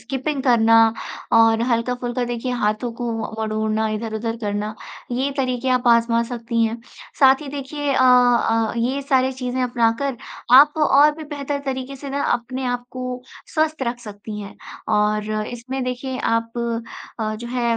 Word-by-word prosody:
Skipping 265 +4 -3
करना 230 -3 +4 0.6
और 225 0 +5
हल्का-फुल्का 245 +1 -1
देखिए 240 +1 -3
हाथों 215 +3 0
को 240 - -2
व - - -2
वड़ोड़ना, 220 0 -1
इधर-उधर 225 +1 -3
करना, 210 -1 -3 0.4
ये 260 +3 0
तरीके 255 -1 -1
आप 250 -1 +1
आज़मा 235 0 +4
सकती 230 -1 -1
हैं। 225 +1 -3 0.4
साथ 265 0 +6
ही 285 - -7
देखिए 285 +1 -3
अ - - +2
अ, 245 -3 +4
ये 255 +4 -1
सारे 265 -1 +2
चीज़ें 255 0 -3
अपनाकर 245 +2 0 0.4
आप 290 +4 +8
और 300 -1 +5
भी 315 - -7
बेहतर 285 -1 -4
तरीके 265 0 -4
से 275 0 -8
ना, 280 +1 -1
अपने 250 +2 -1
आप 245 0 -2
को 255 0 -5 0.3
स्वस्थ 310 -2 0
रख 240 -1 -2
सकती 210 -1 -8
हैं 200 -1 -9 0.4
और 210 0 +1 0.2
इसमें 255 +2 -5
देखिए, 255 +1 -4
आप 230 0 0 0.7
अ, 215 0 -1
जो 235 +2 -7
है 240 -2 0
245 Hz, 160 wpm, -21 LUFS, 225-265 Hz, 0.7 s, आप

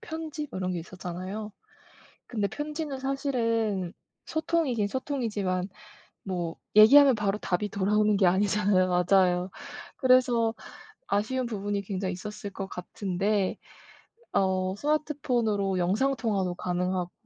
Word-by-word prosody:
편지 320 -7 -5
뭐 - - -5
이런 185 -1 -1
게 175 - -2
있었잖아요. 185 +4 -6 0.8
근데 210 -4 -1
편지는 295 - -4
사실은 230 - -1 0.3
소통이긴 315 -9 0
소통이지만 205 -8 -2 0.5
뭐 175 -4 -3 0.2
얘기하면 265 +5 +8
바로 210 -1 -1
답이 200 +3 -1
돌아오는 210 +2 +2
게 195 -2 +4
아니잖아요. 195 0 +2 0.2
맞아요. 185 -1 +3 0.5
그래서 250 -3 +4 0.5
아쉬운 250 +6 0
부분이 205 -3 -2
굉장히 190 -1 -3
있었을 205 +2 -7
것 195 0 -5 0.8
같은데 - - -3 0.8
어 185 -1 +1
스마트폰으로 240 -9 0
영상통화도 200 -1 0
가능하고 180 0 -2
210 Hz, 295 characters per minute, -28 LUFS, 185-255 Hz, 0.8 s, 얘기하면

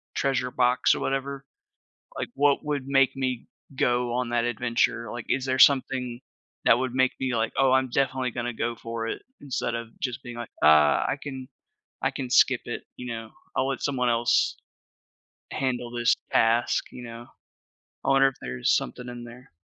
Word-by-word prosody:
treasure 130 -2 0
box 125 0 +3
or - - -4
whatever. 135 0 -2 0.7
Like, - - -2
what 145 0 +3
would 145 -3 -2
make 135 -1 +3
me 130 -3 -2 0.3
go 120 -1 +1
on 125 -1 -1
that 120 -1 +1
adventure? 120 0 0
Like, 120 -2 -6
is 135 0 0
there 130 0 0
something 130 -3 +4 0.5
that 115 - +6
would 130 0 -2
make 130 0 +2
me, 130 -2 0
like, 115 0 0
"Oh, 135 -1 +4
I'm 130 0 +3
definitely 130 0 0
gonna 120 +1 -3
go 115 +1 -2
for 115 0 -5
it," - - -4 0.2
instead 130 -4 -2
of 115 0 -5
just 125 0 -3
being 120 -2 -8
like, 120 -1 -6
"Ah, 75 -1 +6
I - - 0
can 130 -3 -7 0.6
I - - +2
can 130 -3 -5
skip 130 0 +5
it," 120 - -5
you 125 - -8
know? 115 -1 -7 0.3
"I'll 130 - +2
let 135 -2 -3
someone 130 -3 0
else 115 0 +2 1.0
handle 125 -2 -2
this 120 -1 +2 0.2
task," 115 +1 +2
you 125 - -9
know? 115 0 -9 0.8
I - - -2
wonder 135 0 +6
if 135 - -6
there's 60 0 0
something 125 - -4
in 120 -1 -7
there. 120 +2 -13
125 Hz, 180 wpm, -26 LUFS, 120-130 Hz, 1.0 s, that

